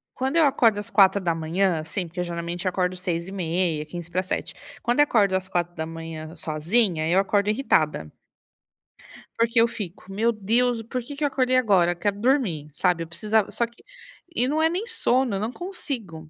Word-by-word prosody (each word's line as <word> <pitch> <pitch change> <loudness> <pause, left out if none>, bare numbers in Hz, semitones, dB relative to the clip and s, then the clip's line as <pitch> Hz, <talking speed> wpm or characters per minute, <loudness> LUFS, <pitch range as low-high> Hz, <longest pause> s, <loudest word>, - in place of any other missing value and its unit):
Quando 265 +5 -1
eu 320 - +6
acordo 235 -7 +3
às 205 - -5
4:00, 185 -2 +2
assim, 165 +4 -4
porque 180 +2 -4
geralmente 170 +1 -3
acordo 180 0 -1
6:30 175 -2 -2
e - - -6
6:45. 175 +3 -4 0.3
Quando 240 +4 0
eu - - +9
acordo 205 -9 +2
às 190 0 -2
4:00 165 -2 -4
sozinha, 165 +2 +1
eu 180 +3 +4
acordo 200 +1 +1
irritada. 155 - +1 1.3
Porque 230 +1 +3
eu 230 - +5
fico: 195 -4 -8
"Meu 225 +4 +2
Deus, 230 +3 +1
porque 250 +4 -5
que 295 - -4
eu - - +4
acordei 255 -2 +1
agora, 190 -8 +3
quero 200 +3 -2
dormir", 210 - +1
sabe. 170 +2 +1
Eu - - -9
precisava 210 +5 +1
só 235 - 0
que 235 +1 -23 0.5
e 245 - +2
não 305 +3 +1
é 320 - +4
nem 365 +6 -2
sono, 260 - +1
eu - - -2
não 215 +3 -2
consigo. 245 - -6
195 Hz, 170 wpm, -24 LUFS, 170-235 Hz, 1.3 s, eu